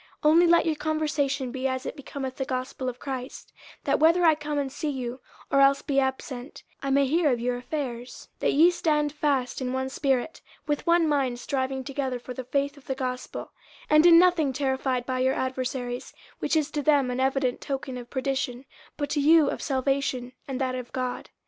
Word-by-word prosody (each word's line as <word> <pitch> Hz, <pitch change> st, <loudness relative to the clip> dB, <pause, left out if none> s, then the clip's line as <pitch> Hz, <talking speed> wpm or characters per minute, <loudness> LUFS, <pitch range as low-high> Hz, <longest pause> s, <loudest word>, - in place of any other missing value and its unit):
50:001:027 300 Hz, -, +6 dB
Only 340 Hz, +2 st, +6 dB
let 340 Hz, 0 st, +5 dB
your 320 Hz, -2 st, +1 dB
conversation 295 Hz, -4 st, -1 dB
be 260 Hz, +1 st, -2 dB
as 260 Hz, 0 st, -3 dB
it -, -, -4 dB
becometh 270 Hz, -2 st, -6 dB
the 270 Hz, -, -1 dB
gospel 255 Hz, 0 st, -3 dB
of 245 Hz, -, -7 dB
Christ: 260 Hz, -1 st, -7 dB, 0.3 s
that -, -, +1 dB
whether 335 Hz, +3 st, +5 dB
I 320 Hz, -, +7 dB
come 300 Hz, -1 st, -4 dB
and 275 Hz, -2 st, -1 dB
see 295 Hz, +2 st, -3 dB
you, 255 Hz, -2 st, -4 dB, 0.3 s
or 275 Hz, -, +5 dB
else 275 Hz, 0 st, +4 dB
be 275 Hz, -1 st, +1 dB
absent, 265 Hz, 0 st, -4 dB, 0.2 s
I 275 Hz, -, -2 dB
may 275 Hz, +1 st, +4 dB
hear 305 Hz, +2 st, +2 dB
of 245 Hz, -, 0 dB
your 245 Hz, +1 st, -1 dB
affairs, 250 Hz, -2 st, -5 dB
that -, -, +2 dB
ye 330 Hz, +5 st, +6 dB
stand 300 Hz, -4 st, 0 dB
fast 275 Hz, -4 st, 0 dB
in 255 Hz, 0 st, -2 dB
one 260 Hz, 0 st, -1 dB
spirit, 270 Hz, +2 st, -1 dB, 0.2 s
with 295 Hz, +3 st, -2 dB
one 340 Hz, -1 st, +4 dB
mind 270 Hz, -5 st, 0 dB
striving 265 Hz, 0 st, -2 dB
together 265 Hz, -2 st, -3 dB
for 250 Hz, +1 st, -8 dB
the 255 Hz, 0 st, -6 dB
faith 280 Hz, +3 st, -1 dB
of 280 Hz, -, -17 dB
the 265 Hz, -, -1 dB
gospel; 255 Hz, -1 st, -4 dB
50:001:028 -, -, -11 dB, 0.5 s
And 305 Hz, -, +6 dB
in 335 Hz, -1 st, +9 dB
nothing 340 Hz, -6 st, +4 dB
terrified 265 Hz, -2 st, -1 dB
by 255 Hz, 0 st, -2 dB
your 260 Hz, +1 st, +2 dB
adversaries: 255 Hz, -1 st, -3 dB, 0.2 s
which -, -, 0 dB
is 310 Hz, -1 st, +1 dB
to 295 Hz, -, -1 dB
them 280 Hz, -3 st, +3 dB
an 250 Hz, -, -3 dB
evident 265 Hz, -1 st, 0 dB
token 270 Hz, -1 st, -4 dB
of 245 Hz, -, -11 dB
perdition, 265 Hz, -1 st, -2 dB, 0.3 s
but 290 Hz, -1 st, -3 dB
to 295 Hz, -, +1 dB
you 305 Hz, 0 st, +5 dB
of -, -, -5 dB
salvation, 265 Hz, -2 st, -1 dB, 0.2 s
and 265 Hz, -2 st, -4 dB
that 260 Hz, -1 st, 0 dB
of 250 Hz, -1 st, -6 dB
God. 255 Hz, -1 st, -3 dB
270 Hz, 205 wpm, -26 LUFS, 255-295 Hz, 0.5 s, in